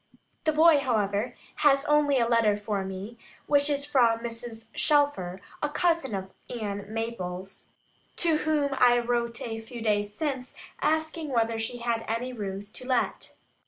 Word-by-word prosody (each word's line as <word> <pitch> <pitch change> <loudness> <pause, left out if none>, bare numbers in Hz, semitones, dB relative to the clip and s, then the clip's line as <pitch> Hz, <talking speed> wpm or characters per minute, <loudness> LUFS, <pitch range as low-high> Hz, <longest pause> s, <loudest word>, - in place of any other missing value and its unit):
The 310 - +4
boy, 315 0 +6
however, 220 -2 0 0.2
has 275 -1 +4
only 295 -2 +3
a 235 -2 +3
letter 230 -3 +3
for 205 -1 -2
me, 190 +5 -7 0.3
which 285 0 +3
is 285 -1 0
from 240 -6 +3
Mrs. 230 -1 -5
Shelfer 290 - +1 0.2
(a 295 - 0
cousin 325 - +1
of 190 0 -5 0.2
Ann 205 -3 -4
Maples), 195 -5 -5 0.5
to 330 -3 +3
whom 305 -2 +1
I 245 -1 +6
wrote 235 -1 -1
a 225 -1 -4
few 230 +2 -9
days 205 -2 0
since, 265 +2 -3 0.3
asking 315 0 0
whether 230 -3 +1
she 225 +2 -2
had 235 -1 -1
any 240 +3 -2
rooms 200 -2 -5
to 255 +3 -8
let. 255 -2 -1
235 Hz, 155 wpm, -27 LUFS, 215-285 Hz, 0.5 s, boy